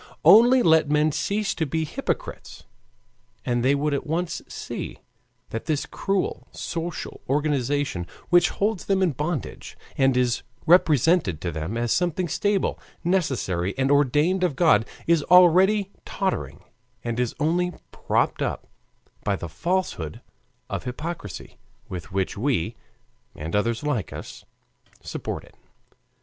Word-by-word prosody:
Only 245 Hz, +3 st, +8 dB
let 160 Hz, -4 st, +4 dB
men 150 Hz, +1 st, +3 dB
cease 205 Hz, +6 st, -1 dB
to 160 Hz, -, -2 dB
be 160 Hz, +3 st, -1 dB
hypocrites, -, -, -5 dB, 0.8 s
and 120 Hz, -1 st, 0 dB
they 135 Hz, +3 st, +4 dB
would 145 Hz, +1 st, 0 dB
at 140 Hz, -, -2 dB
once 165 Hz, +2 st, -2 dB
see -, -, -6 dB, 0.5 s
that 115 Hz, -, -4 dB
this 150 Hz, -3 st, 0 dB
cruel 195 Hz, -1 st, -2 dB
social 170 Hz, -1 st, -5 dB
organization, 140 Hz, -, 0 dB, 0.2 s
which 175 Hz, 0 st, +5 dB
holds 205 Hz, -2 st, -1 dB
them 195 Hz, -1 st, +2 dB
in 180 Hz, -, +3 dB
bondage, 150 Hz, +1 st, -4 dB, 0.2 s
and 135 Hz, -1 st, +3 dB
is 125 Hz, -1 st, +1 dB, 0.2 s
represented 160 Hz, -, +4 dB
to 85 Hz, -, -2 dB
them 80 Hz, +8 st, -4 dB
as 120 Hz, -1 st, -1 dB
something 175 Hz, 0 st, 0 dB
stable, 200 Hz, +3 st, 0 dB, 0.2 s
necessary, 130 Hz, -, 0 dB
and 135 Hz, +1 st, +2 dB
ordained 145 Hz, +6 st, +3 dB
of 170 Hz, -7 st, +1 dB
God, 115 Hz, -10 st, +4 dB, 0.2 s
is 165 Hz, -2 st, +3 dB
already 185 Hz, +3 st, +5 dB
tottering 190 Hz, -1 st, -3 dB, 0.4 s
and 120 Hz, 0 st, -2 dB
is 125 Hz, -2 st, -1 dB
only 175 Hz, +4 st, +1 dB, 0.2 s
propped -, -, 0 dB
up -, -, -2 dB, 0.6 s
by 100 Hz, -, +1 dB
the 85 Hz, -, -6 dB
falsehood 90 Hz, -, -2 dB, 0.5 s
of -, -, -4 dB
hypocrisy, 125 Hz, -, -6 dB, 0.3 s
with 90 Hz, -2 st, -7 dB
which 95 Hz, 0 st, -1 dB
we, 110 Hz, -, 0 dB, 0.6 s
and 80 Hz, +4 st, -4 dB
others 115 Hz, +5 st, 0 dB
like 145 Hz, -9 st, -1 dB
us, -, -, -9 dB, 0.5 s
support -, -, -5 dB
it. -, -, -18 dB
150 Hz, 135 wpm, -24 LUFS, 120-180 Hz, 0.8 s, Only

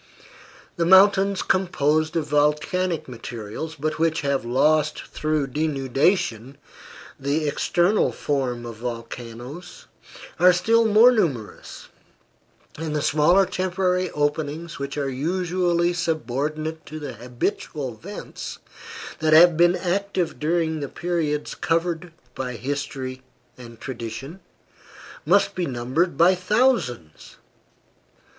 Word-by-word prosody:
The 170 Hz, -, +1 dB
mountains 195 Hz, +1 st, +5 dB
composed 155 Hz, -4 st, +1 dB
of 165 Hz, -3 st, 0 dB
volcanic 150 Hz, +4 st, +1 dB
materials, 120 Hz, +5 st, -7 dB
but 155 Hz, +1 st, -3 dB
which 165 Hz, 0 st, +1 dB
have 140 Hz, -2 st, 0 dB
lost 150 Hz, +5 st, +2 dB
through 155 Hz, -2 st, -1 dB
denudation 135 Hz, -, 0 dB, 0.6 s
the 145 Hz, +3 st, -1 dB
external 175 Hz, +7 st, +2 dB
form 125 Hz, -4 st, -2 dB
of 115 Hz, -2 st, -8 dB
volcanoes, 120 Hz, +6 st, -8 dB, 0.5 s
are 180 Hz, 0 st, +7 dB
still 230 Hz, +6 st, +3 dB
more 220 Hz, +4 st, +7 dB
numerous, 140 Hz, -, -3 dB, 0.9 s
and 160 Hz, -2 st, -3 dB
the 150 Hz, -, -1 dB
smaller 170 Hz, +6 st, +4 dB
temporary 185 Hz, 0 st, 0 dB
openings 150 Hz, +2 st, -2 dB
which 140 Hz, +1 st, -5 dB
are 140 Hz, -1 st, -1 dB
usually 175 Hz, +4 st, 0 dB
subordinate 155 Hz, -1 st, -2 dB
to 155 Hz, -, -7 dB
the 145 Hz, -4 st, -6 dB
habitual 125 Hz, -, -4 dB
vents 190 Hz, -, -8 dB, 0.6 s
that 155 Hz, 0 st, +2 dB
have 170 Hz, +1 st, +8 dB
been 175 Hz, +2 st, +4 dB
active 185 Hz, -2 st, -2 dB
during 160 Hz, 0 st, 0 dB
the 140 Hz, -2 st, -4 dB
periods 165 Hz, -4 st, -2 dB
covered 170 Hz, +1 st, -1 dB, 0.2 s
by 125 Hz, -1 st, -4 dB
history 130 Hz, 0 st, -4 dB, 0.3 s
and 115 Hz, -2 st, -12 dB
tradition, 130 Hz, -, -7 dB, 0.9 s
must 200 Hz, +4 st, +4 dB
be 180 Hz, -2 st, -2 dB
numbered 130 Hz, +6 st, -1 dB
by 175 Hz, +4 st, +6 dB
thousands. 185 Hz, -, 0 dB
155 Hz, 110 wpm, -23 LUFS, 135-175 Hz, 0.9 s, have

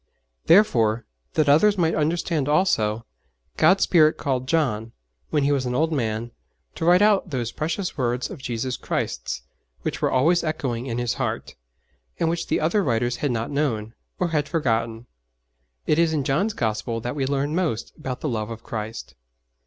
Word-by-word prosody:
Therefore, 120 Hz, -, +4 dB, 0.3 s
that 155 Hz, -2 st, +3 dB
others 200 Hz, +9 st, +5 dB
might 165 Hz, -2 st, +2 dB
understand 155 Hz, -2 st, 0 dB
also, 115 Hz, -, +2 dB, 0.5 s
God's 180 Hz, +5 st, +4 dB
Spirit 155 Hz, -3 st, +4 dB
called 130 Hz, -3 st, -2 dB
John, 115 Hz, -8 st, 0 dB, 0.4 s
when 150 Hz, -2 st, +1 dB
he 140 Hz, -, +2 dB
was 135 Hz, -3 st, 0 dB
an 125 Hz, -, -2 dB
old 160 Hz, +4 st, +1 dB
man, 115 Hz, -3 st, -2 dB, 0.4 s
to -, -, -4 dB
write 180 Hz, +3 st, +6 dB
out 205 Hz, -3 st, +3 dB
those 120 Hz, -5 st, -2 dB
precious 165 Hz, +2 st, -3 dB
words 125 Hz, 0 st, 0 dB
of -, -, -9 dB
Jesus 125 Hz, 0 st, -3 dB
Christ's -, -, -3 dB, 0.4 s
which -, -, -3 dB
were -, -, +2 dB
always 165 Hz, +7 st, +3 dB
echoing 130 Hz, -6 st, -2 dB
in 115 Hz, -2 st, -3 dB
his 120 Hz, -1 st, 0 dB
heart, -, -, -3 dB, 0.7 s
and 165 Hz, -, +2 dB
which 170 Hz, 0 st, -3 dB
the -, -, +1 dB
other 170 Hz, +6 st, +2 dB
writers 120 Hz, -3 st, 0 dB
had 145 Hz, -, -1 dB
not 115 Hz, 0 st, -2 dB
known, 115 Hz, -7 st, -1 dB, 0.2 s
or 180 Hz, -, 0 dB
had 150 Hz, -2 st, 0 dB
forgotten. 115 Hz, -7 st, -1 dB, 0.8 s
It 155 Hz, -, +2 dB
is 165 Hz, -1 st, +3 dB
in 150 Hz, -3 st, 0 dB
John's 155 Hz, +11 st, +1 dB
Gospel 110 Hz, +1 st, -1 dB
that 120 Hz, +4 st, -4 dB
we 135 Hz, -2 st, -1 dB
learn 140 Hz, +2 st, -1 dB
most 160 Hz, -10 st, -1 dB
about 130 Hz, -4 st, -5 dB
the -, -, -2 dB
love 110 Hz, -5 st, -2 dB
of 115 Hz, 0 st, -8 dB
Christ. 110 Hz, -9 st, -6 dB
135 Hz, 175 wpm, -24 LUFS, 115-160 Hz, 0.8 s, write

